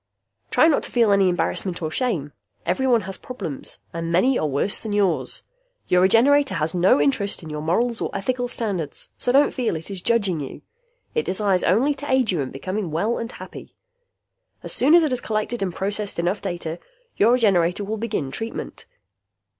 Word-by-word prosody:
Try 315 Hz, -, +5 dB
not 310 Hz, -, +3 dB
to -, -, -4 dB
feel 230 Hz, -4 st, +3 dB
any 195 Hz, -2 st, +4 dB
embarrassment 180 Hz, 0 st, -1 dB
or 155 Hz, -2 st, -3 dB
shame. 160 Hz, -, -1 dB, 0.3 s
Everyone 235 Hz, +7 st, +2 dB
has 195 Hz, 0 st, -6 dB
problems 195 Hz, -, -7 dB, 0.2 s
and 165 Hz, 0 st, -3 dB
many 245 Hz, +10 st, +3 dB
are 155 Hz, -, 0 dB
worse 145 Hz, +8 st, 0 dB
than 215 Hz, -2 st, -5 dB
yours! 195 Hz, -5 st, +1 dB, 0.5 s
Your 180 Hz, 0 st, +4 dB
Regenerator 235 Hz, +4 st, +4 dB
has 155 Hz, -1 st, 0 dB
no 180 Hz, -3 st, +4 dB
interest 160 Hz, +8 st, +1 dB
in 155 Hz, -, -8 dB
your 150 Hz, 0 st, -4 dB
morals 225 Hz, +9 st, 0 dB
or -, -, -1 dB
ethical 245 Hz, +5 st, -2 dB
standards, 200 Hz, -10 st, -3 dB
so 245 Hz, -, 0 dB
don't 280 Hz, +3 st, +4 dB
feel 245 Hz, -9 st, -1 dB
it 160 Hz, +5 st, -6 dB
is 190 Hz, -2 st, -3 dB
'judging' 200 Hz, -8 st, +1 dB
you. 135 Hz, -2 st, -7 dB, 0.5 s
It 465 Hz, -, 0 dB
desires 195 Hz, -2 st, +1 dB
only 240 Hz, -, +3 dB
to 285 Hz, -1 st, -6 dB
aid 260 Hz, -5 st, +3 dB
you 170 Hz, -5 st, 0 dB
in 130 Hz, -, -3 dB
becoming 185 Hz, +7 st, -4 dB
well 200 Hz, +10 st, -1 dB
and 230 Hz, +1 st, -5 dB
happy. -, -, -11 dB, 0.9 s
As -, -, 0 dB
soon 290 Hz, +6 st, +5 dB
as 345 Hz, -, +6 dB
it 305 Hz, -, +1 dB
has 250 Hz, -1 st, 0 dB
collected 215 Hz, +2 st, -2 dB
and 190 Hz, -2 st, -1 dB
processed 200 Hz, +3 st, -2 dB
enough 175 Hz, +4 st, -1 dB
data, 175 Hz, -3 st, -4 dB, 0.4 s
your 225 Hz, +4 st, +5 dB
Regenerator 195 Hz, -6 st, +2 dB
will 215 Hz, +2 st, -3 dB
begin 205 Hz, -11 st, -3 dB
treatment. 225 Hz, +9 st, -6 dB
200 Hz, 185 wpm, -23 LUFS, 170-235 Hz, 0.9 s, as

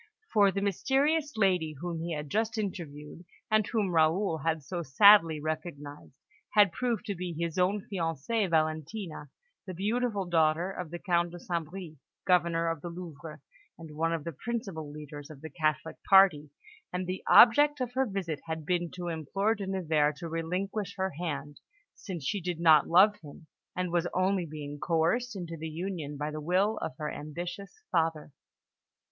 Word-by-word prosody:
For 205 Hz, -3 st, +5 dB
the 195 Hz, +1 st, -2 dB
mysterious 280 Hz, -, +1 dB
lady 180 Hz, -7 st, +2 dB
whom 165 Hz, +3 st, -5 dB
he 170 Hz, +1 st, -4 dB
had 150 Hz, 0 st, -5 dB
just 225 Hz, -, -1 dB
interviewed, 170 Hz, -6 st, -6 dB, 0.3 s
and 215 Hz, -1 st, +3 dB
whom 210 Hz, -5 st, 0 dB
Raoul 165 Hz, +2 st, +2 dB
had 160 Hz, 0 st, -1 dB
so 175 Hz, +5 st, -4 dB
sadly 165 Hz, +1 st, +6 dB
recognised, 150 Hz, -3 st, -6 dB, 0.4 s
had 205 Hz, -3 st, +6 dB
proved 235 Hz, -2 st, -2 dB
to 205 Hz, -, -2 dB
be 180 Hz, -1 st, -5 dB
his 170 Hz, +1 st, -2 dB
own 195 Hz, +3 st, +1 dB
fiancée, 185 Hz, +3 st, -1 dB
Valentina, 155 Hz, +1 st, -2 dB, 0.4 s
the 185 Hz, -, -6 dB
beautiful 210 Hz, +1 st, -1 dB
daughter 165 Hz, +1 st, +2 dB
of 180 Hz, -4 st, -6 dB
the 175 Hz, -, -5 dB
Count 175 Hz, -1 st, +1 dB
de 175 Hz, +1 st, -10 dB
St. 170 Hz, -3 st, -3 dB
Bris, 180 Hz, -3 st, -8 dB, 0.3 s
Governor 170 Hz, -2 st, +2 dB
of 165 Hz, -2 st, -2 dB
the 175 Hz, -, -5 dB
Louvre, 165 Hz, -3 st, -9 dB, 0.4 s
and 160 Hz, -2 st, -11 dB
one 165 Hz, +2 st, 0 dB
of 165 Hz, -3 st, -2 dB
the 170 Hz, -, -4 dB
principal 195 Hz, -, -5 dB
leaders 145 Hz, -1 st, -9 dB
of 150 Hz, -3 st, -12 dB
the 160 Hz, -, -8 dB
Catholic 155 Hz, 0 st, -1 dB
party; 185 Hz, -7 st, +6 dB, 0.4 s
and 180 Hz, +1 st, -3 dB
the 185 Hz, +1 st, -4 dB
object 290 Hz, +5 st, +7 dB
of 250 Hz, -1 st, -3 dB
her 265 Hz, 0 st, +1 dB
visit 185 Hz, -7 st, -3 dB
had 160 Hz, -1 st, -4 dB
been 175 Hz, 0 st, 0 dB
to 175 Hz, -1 st, -5 dB
implore 185 Hz, +7 st, 0 dB
De 200 Hz, -3 st, -6 dB
Nevers 155 Hz, -6 st, +1 dB
to 170 Hz, -, -6 dB
relinquish 180 Hz, +5 st, -3 dB
her 190 Hz, 0 st, -1 dB
hand, 150 Hz, -2 st, -5 dB, 0.3 s
since 175 Hz, -8 st, -7 dB
she 200 Hz, +6 st, -1 dB
did 175 Hz, -1 st, -3 dB
not 160 Hz, -3 st, +6 dB
love 200 Hz, +5 st, +5 dB
him, 150 Hz, +1 st, -13 dB, 0.3 s
and 180 Hz, -1 st, -2 dB
was 175 Hz, 0 st, +1 dB
only 185 Hz, -1 st, +1 dB
being 145 Hz, -1 st, -7 dB
coerced 175 Hz, -, 0 dB
into 170 Hz, -3 st, -6 dB
the 160 Hz, 0 st, -6 dB
union 160 Hz, -3 st, -5 dB
by 150 Hz, +1 st, -3 dB
the 155 Hz, 0 st, -5 dB
will 190 Hz, +7 st, +1 dB
of -, -, -4 dB
her 150 Hz, -1 st, -3 dB
ambitious 175 Hz, -, -7 dB
father. 160 Hz, -2 st, 0 dB
170 Hz, 175 wpm, -29 LUFS, 155-195 Hz, 0.4 s, object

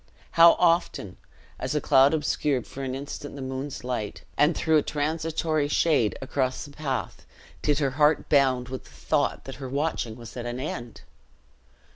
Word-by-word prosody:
How 170 Hz, 0 st, +8 dB
often, 165 Hz, -, +1 dB, 0.4 s
as -, -, -2 dB
a -, -, +3 dB
cloud 135 Hz, +4 st, +5 dB
obscured 150 Hz, -3 st, 0 dB
for 135 Hz, -, -8 dB
an 130 Hz, -1 st, -3 dB
instant 145 Hz, +1 st, -7 dB
the 140 Hz, -, -7 dB
moon's 130 Hz, +1 st, -5 dB
light, 120 Hz, -5 st, -4 dB
and 150 Hz, +4 st, +3 dB
threw 160 Hz, -1 st, +3 dB
a -, -, +4 dB
transitory 155 Hz, 0 st, -1 dB
shade 145 Hz, -, +2 dB
across 130 Hz, 0 st, -1 dB
the 145 Hz, -, -12 dB
path, 140 Hz, -4 st, -4 dB, 0.4 s
did 150 Hz, -2 st, +2 dB
her 140 Hz, -3 st, +1 dB
heart 150 Hz, +3 st, +3 dB
bound 130 Hz, -4 st, +3 dB
with 130 Hz, 0 st, -6 dB
the -, -, -16 dB
thought 65 Hz, -2 st, -1 dB
that 135 Hz, -1 st, -8 dB
her 130 Hz, -, -5 dB
watching 140 Hz, -5 st, -2 dB
was 115 Hz, -1 st, -11 dB
at 120 Hz, -1 st, -5 dB
an 120 Hz, +1 st, -4 dB
end! 120 Hz, -4 st, -6 dB
140 Hz, 170 wpm, -26 LUFS, 125-150 Hz, 0.4 s, How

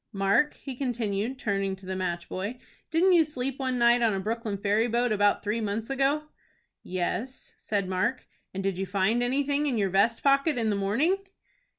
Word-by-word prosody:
Mark," 195 Hz, +9 st, +2 dB
he 270 Hz, -, -7 dB
continued, 240 Hz, -2 st, -2 dB
turning 195 Hz, -4 st, -1 dB
to 190 Hz, 0 st, -14 dB
the 190 Hz, 0 st, -4 dB
match 175 Hz, -2 st, -3 dB
boy, 205 Hz, +7 st, -4 dB, 0.3 s
"didn't 350 Hz, +3 st, +4 dB
you 340 Hz, -2 st, +6 dB
sleep 270 Hz, -3 st, -4 dB
one 260 Hz, -2 st, -1 dB
night 240 Hz, 0 st, +4 dB
on 225 Hz, -4 st, +2 dB
a -, -, -1 dB
Brooklyn 220 Hz, +1 st, -3 dB
ferry 205 Hz, +3 st, +1 dB
boat 240 Hz, +1 st, +1 dB
about 205 Hz, -1 st, +2 dB
three 215 Hz, +2 st, -1 dB
months 215 Hz, +3 st, -3 dB
ago?" 275 Hz, +3 st, +1 dB, 0.6 s
"Yes," 195 Hz, +8 st, -4 dB
said 200 Hz, -3 st, -1 dB
Mark. 190 Hz, +8 st, -1 dB, 0.2 s
"And 195 Hz, +1 st, -4 dB
did 195 Hz, -2 st, -1 dB
you 195 Hz, -, -2 dB
find 200 Hz, +5 st, +1 dB
anything 280 Hz, +4 st, +1 dB
in 255 Hz, -5 st, 0 dB
your 195 Hz, -3 st, +1 dB
vest 215 Hz, +5 st, +2 dB
pocket 275 Hz, +1 st, +3 dB
in 225 Hz, -2 st, +1 dB
the -, -, 0 dB
morning?" 230 Hz, -, +1 dB
225 Hz, 190 wpm, -27 LUFS, 195-265 Hz, 0.6 s, you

